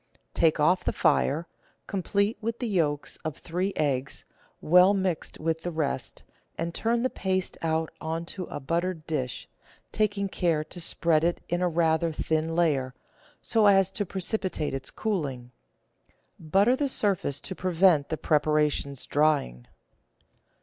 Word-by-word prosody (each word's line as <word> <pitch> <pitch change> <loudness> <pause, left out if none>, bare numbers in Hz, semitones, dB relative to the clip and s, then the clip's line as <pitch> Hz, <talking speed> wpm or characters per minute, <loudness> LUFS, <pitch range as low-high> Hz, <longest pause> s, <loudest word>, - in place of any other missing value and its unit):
Take 160 -2 +2
off 180 +5 +3
the - - -1
fire, 160 +5 +2 0.4
complete 200 +2 0
with 230 +1 -2
the 245 - -3
yolks 155 -8 -1
of 155 -3 -6
three 180 +4 -2
eggs, 140 -3 -1 0.3
well 180 +4 +5
mixed 185 -4 -2
with 160 0 -1
the 175 - -3
rest, 155 -6 -3 0.3
and 170 0 -3
turn 235 +4 0
the 255 - +2
paste 185 -1 -1
out 160 0 0
on 165 +1 -3
to 185 +1 -6
a - - -6
buttered 165 +3 -2
dish, 130 -6 -3 0.4
taking 205 -2 0
care 170 -5 0
to 175 +3 -10
spread 165 -1 +1
it 170 +1 +1
in 175 +1 0
a 180 - +2
rather 165 0 +2
thin 160 +1 -1
layer, 140 -7 +1 0.5
so 220 -3 +3
as 195 -1 +5
to 205 - -2
precipitate 185 -4 -3
its 135 -1 -3
cooling. 140 - -3 0.9
Butter 195 +10 +3
the 280 +1 -1
surface 195 - 0
to 190 - -5
prevent 180 -4 +3
the 160 - -2
pre 150 -1 +2
paration's 150 -2 0
drying. 145 - +1
165 Hz, 150 wpm, -27 LUFS, 155-190 Hz, 0.9 s, well